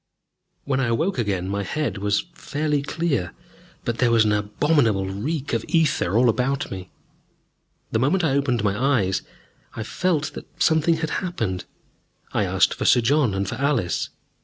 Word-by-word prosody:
When 135 -2 0
I 130 - +1
awoke 155 +9 0
again, 95 -5 -1
my 100 +1 -1
head 145 +2 -2
was 100 0 0
fairly 150 -3 -1
clear, 140 - -1 0.5
but 120 -1 -2
there 125 - +4
was 115 -2 +4
an 105 - +2
abominable 105 0 +2
reek 130 +11 -3
of 115 -1 0
ether 155 - +2
all 125 +1 +5
about 130 +4 0
me. 95 -1 -7 1.0
The 110 - +1
moment 170 +9 +2
I 160 - +2
opened 135 -5 +1
my 100 -1 +1 0.2
eyes, 95 -1 0 0.5
I 110 - -3
felt 155 - -1
that - - -8
something 160 +1 +3
had 160 -1 -3
happened. 110 - -3 0.7
I - - +1
asked - - +3
for - - -4
Sir 120 - +5
John 125 -3 +2
and 100 0 -1
for - - -4
Alice. 130 - 0
125 Hz, 165 wpm, -23 LUFS, 100-150 Hz, 1.0 s, all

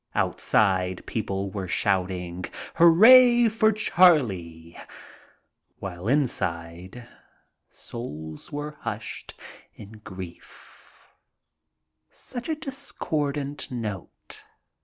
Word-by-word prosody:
Outside 95 -3 +1
people 100 -3 -3
were 95 -2 -5
shouting, 90 -2 -1
' - - -8
' - - -17
Hooray 240 +8 +7
for 220 0 +3
Charlie! 115 - +2 0.5
" - - -38
while 90 0 -6
inside 95 - -2 0.6
souls 80 -10 -8
were 150 +1 -6
hushed - - -7 0.4
in 105 0 -12
grief. 90 -2 -12 1.0
Such 245 +3 -8
a 315 - 0
discordant 150 - -4
note. 110 -7 -7
110 Hz, 85 wpm, -25 LUFS, -, 1.0 s, Hooray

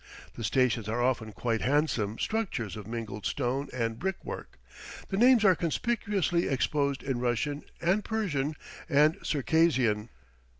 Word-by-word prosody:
The 115 - -7
stations 115 -1 +1
are 115 +2 -1
often 120 -3 0
quite 115 +1 -1
handsome 125 -7 +1
structures 180 - -2
of 105 -2 -8
mingled 110 -3 -5
stone 135 +1 -1
and 115 -2 -2
brickwork. 190 0 -5 0.5
The 195 - -1
names 240 -1 +6
are 190 - +7
conspicuously 185 0 0
exposed 140 +2 0
in 135 -3 -2
Russian 125 +5 -1
and 190 +5 +1
Persian 155 -11 -1 0.3
and 150 +2 +4
Circassian. 135 -8 +2
135 Hz, 130 wpm, -29 LUFS, 115-170 Hz, 0.5 s, are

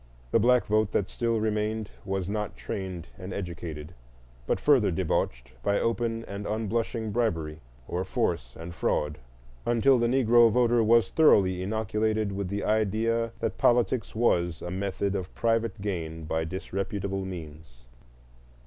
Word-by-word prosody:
The - - +4
black 125 +2 +4
vote 110 0 +2
that 95 - 0
still 115 -1 0
remained 110 0 -1
was 95 -2 -2
not 105 0 -3
trained 95 -4 -5
and 95 +1 -7
educated, 85 -4 -6 0.5
but - - +1
further 135 -8 +4
debauched 60 -7 -1
by 100 +10 +1
open 115 0 -1
and 100 +1 -6
unblushing 110 +1 -2
bribery, 80 -10 -1 0.3
or 90 +1 -2
force 60 -8 -2
and 85 +1 -7
fraud; 75 -3 -1 0.4
until 120 +2 +4
the 120 - +2
Negro 120 -2 +5
voter 120 0 +3
was 115 -2 +4
thoroughly 95 - +4
inoculated 110 +1 0
with 100 -1 -3
the 100 +2 -3
idea 110 +2 +1
that 115 - -2
politics 120 -2 +2
was 85 -7 +1
a 90 - -4
method 100 +1 -2
of 95 -2 -4
private 115 -3 0
gain 80 -5 -4
by 80 +1 -1
disreputable 95 +2 -3
means. 75 -9 -9
100 Hz, 140 wpm, -28 LUFS, 90-115 Hz, 0.5 s, Negro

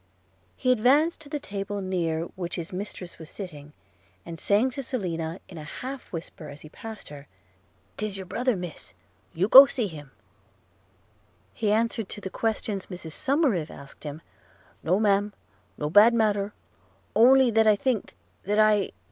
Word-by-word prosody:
– 95 -1 -38
He 255 - +1
advanced 280 +8 +3
to 290 - -10
the 295 - -3
table 205 -4 -4
near 170 -4 -1
which 175 -2 -4
his 170 0 -6
mistress 185 -2 -7
was 160 -1 -10
sitting, 150 -7 -8 0.5
and 165 -1 -8
saying 215 +6 +2
to 275 - -5
Selina 175 -10 -3
in 170 - -10
an 150 - -8
half 260 - -7
whisper 165 -2 -8
as 145 +1 -11
he 155 - -12
passed 220 +5 -9
her 145 -1 -11 0.3
– - - -38
''Tis 210 -2 -3
your 190 - -6
brother, 245 +6 0
miss, 180 -3 -8 0.4
you 180 +4 +1
go 270 +5 +11
see 255 -4 -2
him,' 150 -7 -8 1.4
he 215 -3 0
answered 225 -1 0
to - - -7
the 190 -2 -6
questions 215 -3 -2
Mrs 175 -4 -8
Somerive 260 - +1
asked 140 - -12
him 150 +1 -7 0.3
– - - -31
'No, 185 +5 +2
Ma'am 205 -1 +2 0.2
– - - -37
no 150 - -2
bad 210 +9 +6
matter 205 -3 +1 0.4
– - - -35 0.2
only 255 +1 +6
that 220 0 +4
I 215 - +6
thinked, 225 - -2 0.3
that 205 +2 -1
I 215 -2 +3
200 Hz, 175 wpm, -26 LUFS, 170-230 Hz, 1.4 s, go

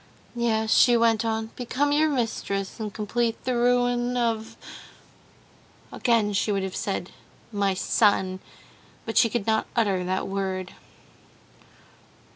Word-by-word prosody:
"Yes," 220 -2 +1
she 240 -1 +6
went 230 -1 +3
on, 220 0 -2
"become 265 +4 -1
your 310 +2 +3
mistress, 220 -7 -2
and 215 -2 -4
complete 225 +3 -1
the 255 -1 0
ruin 245 0 +1
of...." 225 -1 -1 1.3
Again 225 -4 +1
she 200 +2 +1
would 195 -1 0
have 190 -1 -4
said 195 -2 -3 0.4
"my 200 -2 0
son," 190 -1 +2 0.7
but 225 - -5
she 230 - +5
could 215 -2 -2
not 220 -1 +1
utter 200 -6 +1
that 185 +1 -2
word. 190 -1 -3
220 Hz, 125 wpm, -25 LUFS, 200-240 Hz, 1.3 s, she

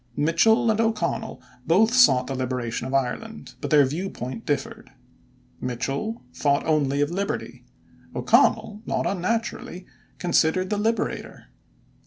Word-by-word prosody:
Mitchel 220 +10 +3
and 220 +1 +1
O'Connell 225 0 -1 0.3
both 215 +8 +4
sought 245 - +5
the 135 - -4
liberation 125 -2 -3
of 130 - -6
Ireland, 180 - -3
but - - -3
their 150 -3 +6
viewpoint 130 -6 -5
differed. 145 - -3 0.7
Mitchel 135 - -3
thought 140 -1 +1
only 145 -3 +1
of 145 +2 0
Liberty; 195 +3 -4 0.5
O'Connell 210 0 +2
not - - -1
unnaturally 205 0 -2 0.3
considered 180 +2 +1
the 205 - 0
"Liberator." 225 +2 -2
170 Hz, 120 wpm, -24 LUFS, 135-220 Hz, 0.7 s, their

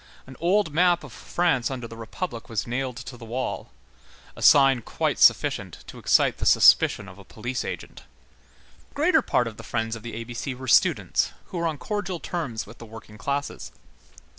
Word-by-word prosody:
An 130 - -12
old 180 -1 +1
map 175 +1 +3
of - - -11
France 165 -9 0
under 125 -3 -5
the 115 - -10
Republic 115 +3 -6
was 110 -4 -2
nailed 125 0 -3
to 125 - -8
the 120 - -13
wall,—a 65 - -8
sign 135 -3 +6
quite - - -2
sufficient - - +3
to - - -11
excite - - +3
the - - -2
suspicion 100 - +5
of 90 +1 -13
a - - -12
police 120 +5 -5
agent. - - -7 0.9
The - - -29
greater 315 +2 +3
part 125 - +1
of 110 -2 -8
the - - -8
Friends 115 -1 -2
of 115 - -9
the 120 0 -7
A 115 - -4
B 120 +1 -9
C 125 +2 -4
were 130 +1 -9
students, 115 - +3 0.2
who 180 - -4
were 170 - 0
on 155 -2 -3
cordial 195 -1 -4
terms 145 -13 -4
with 110 +4 -14
the 115 - -9
working 105 -1 -12
classes. 140 +3 -3
125 Hz, 190 wpm, -25 LUFS, 115-165 Hz, 0.9 s, sign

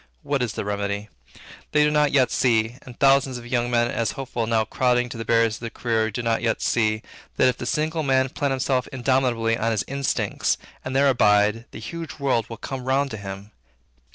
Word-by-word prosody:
What 140 -2 -1
is 120 -3 -1
the - - -4
remedy? 100 +1 -3 0.6
They 150 0 +5
did 150 0 +2
not 150 -1 +3
yet 130 -3 +3
see, 115 -1 +1
and 125 -2 -13
thousands 135 -2 +4
of 120 - -10
young 120 0 0
men 120 0 +2
as 115 -3 -1
hopeful 125 -4 -3
now 110 -1 +2
crowding 125 +1 +1
to 120 - -7
the - - -3
barriers 115 -1 +2
for 115 - -7
the - - -3
career 110 -1 0
do 115 +3 -4
not 115 -1 +1
yet 115 -1 0
see, 110 -1 +1 0.3
that, - - +5
if 125 - +1
the 120 - -4
single 155 +3 0
man 130 -2 +2
plant 140 +2 -1
himself 130 -1 0
indomitably 125 -3 +1
on 115 - +1
his 110 -3 0
instincts, 140 -1 -1 0.3
and 130 - -4
there 140 +1 +4
abide, 105 -2 +3
the - - -10
huge 165 -3 -7
world 130 -6 0
will 115 - -7
come 130 -2 -6
round 135 +1 +1
to 110 - -5
him. 100 +1 -8
120 Hz, 210 wpm, -24 LUFS, 115-135 Hz, 0.6 s, They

